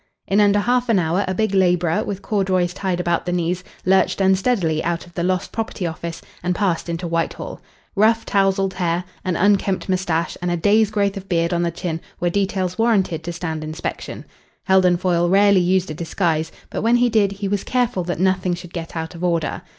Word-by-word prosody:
In 200 +2 +3
under 205 0 +4
half 245 +3 +1
an 225 - +4
hour 175 +3 +1
a 185 - -1
big 215 0 0
labourer, 180 -3 +2
with 200 -1 -5
corduroys 185 -4 0
tied 185 -2 -2
about 175 0 0
the - - 0
knees, 180 +1 -1 0.2
lurched 190 +1 +3
unsteadily 190 -4 +2
out 170 0 -2
of 175 - -18
the 170 - -3
Lost 185 +1 -1
Property 220 -4 -3
Office 165 0 -5 0.2
and 180 0 -1
passed 175 -4 0
into 170 +1 -3
Whitehall. 165 0 -3 0.3
Rough, 225 +2 +3
tousled 195 -1 +1
hair, 175 -1 -1 0.2
an 185 -2 -1
unkempt 195 0 +2
moustache, 175 -3 0
and 180 - -1
a 175 - 0
day's 210 +4 +3
growth 200 -2 0
of 195 0 -9
beard 170 -1 +1
on 170 - +1
the 170 - +1
chin 170 -1 -4 0.2
were 175 0 0
details 190 -1 -1
warranted 195 -8 +1
to 170 - -4
stand 160 -2 -4
inspection. 155 +1 -5 0.4
Heldon 185 -2 +4
Foyle 175 -1 +1
rarely 200 0 +5
used 185 0 +1
a - - -3
disguise, 160 0 -1 0.2
but - - -3
when 230 +2 +3
he 245 0 +4
did 210 -4 +2
he 200 0 -4
was 200 0 -1
careful 245 -7 0
that 175 -2 -3
nothing 185 -1 +1
should 175 0 -11
get 165 -1 -6
out 160 +1 -4
of 170 +1 -8
order. 170 -3 0
185 Hz, 205 wpm, -21 LUFS, 170-200 Hz, 0.4 s, rarely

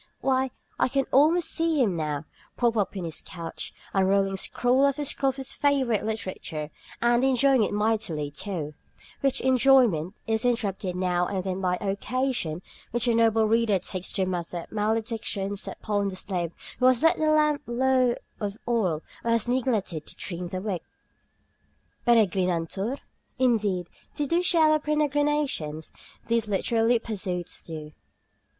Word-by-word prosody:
Why, 265 0 +2 0.3
I - - +4
can 270 +1 0
almost 320 +6 +4
see 325 -2 +1
him 210 -9 +2
now, 150 -2 -2 0.3
propped 235 -2 +2
up 205 -2 0
in 185 - -3
his 160 - -4
couch, 170 -3 -6 0.2
unrolling 195 0 +2
scroll 250 +7 +2
after 285 +1 -1
scroll 275 -1 +1
of 265 - -3
his 270 -1 -4
favorite 270 -6 +1
literature, 185 -8 -4 0.3
and 240 +1 +3
enjoying 265 -1 +4
it - - -1
mightily, 205 -8 0
too, 155 -1 -4 0.5
which 275 -1 0
enjoyment 255 - +4
is 220 +1 0
interrupted 205 -6 -1
now 180 -1 +1
and 190 -2 -2
then 190 0 -3
by 180 -1 +1
the 200 - -3
occasion 200 -6 -2 0.3
which 240 +1 0
the 240 - +3
noble 225 -1 +4
reader 225 -2 +3
takes 185 0 -4
to 190 -2 +1
mutter 175 -2 -3
maledictions 215 -2 -1
upon 205 -2 -2
the 190 - -4
slave 180 -3 -3 0.3
who 255 - +5
has 255 +2 +3
let 325 - +5
the 310 0 +2
lamp 300 -1 +3
run 235 0 -4
low 255 -2 +3 0.2
of 205 -1 -3
oil 190 -10 +1 0.2
or 235 - -1
has 230 0 +2
neglected 230 - -1
to - - -10
trim 180 -1 -5
the 185 +1 -4
wick. 195 -5 -2 1.3
"Peregrinantur?" 195 0 +2 0.4
Indeed, 215 -8 +1 0.3
they 295 - 0
do 335 +5 +2
share 330 -3 +4
our 310 - +3
peregrinations, 290 - 0 0.3
these 230 -1 +1
literary 225 +4 +2
pursuits 185 -6 -4
do. 155 -2 -7
220 Hz, 155 wpm, -26 LUFS, 185-260 Hz, 1.3 s, who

